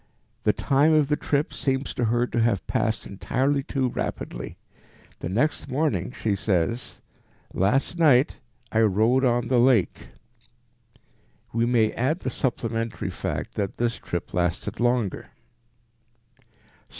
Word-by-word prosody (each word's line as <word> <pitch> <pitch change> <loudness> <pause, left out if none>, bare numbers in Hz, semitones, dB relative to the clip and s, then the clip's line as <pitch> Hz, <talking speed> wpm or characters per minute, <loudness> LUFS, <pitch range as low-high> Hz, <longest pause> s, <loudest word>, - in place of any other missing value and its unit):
The - - +5
time 145 +4 +3
of 150 -2 +3
the 150 - +3
trip 145 0 -1
seems 135 0 -1
to 120 - 0
her 120 +2 +2
to 120 -1 -1
have 115 -5 +1
passed 110 0 -1
entirely 135 +7 0
too 135 -2 -1
rapidly. - - -5 0.6
The - - -4
next 135 +12 0
morning 130 - 0
she 105 -3 -1
says, 100 +4 -1 0.5
"Last 135 - +1
night 140 -5 +4 0.3
I 110 - +3
rode 110 +5 +3
on 120 -1 +2
the 125 -1 +3
lake." 120 -6 +2 1.5
We 115 +1 +1
may 115 -3 +3
add 145 +9 -1
the 130 - -2
supplementary 115 -3 -2
fact - - -4
that 100 -2 -3
this 120 -1 0
trip 85 - -5
lasted 85 -1 -1
longer. 120 -4 0
120 Hz, 130 wpm, -25 LUFS, 110-135 Hz, 1.5 s, The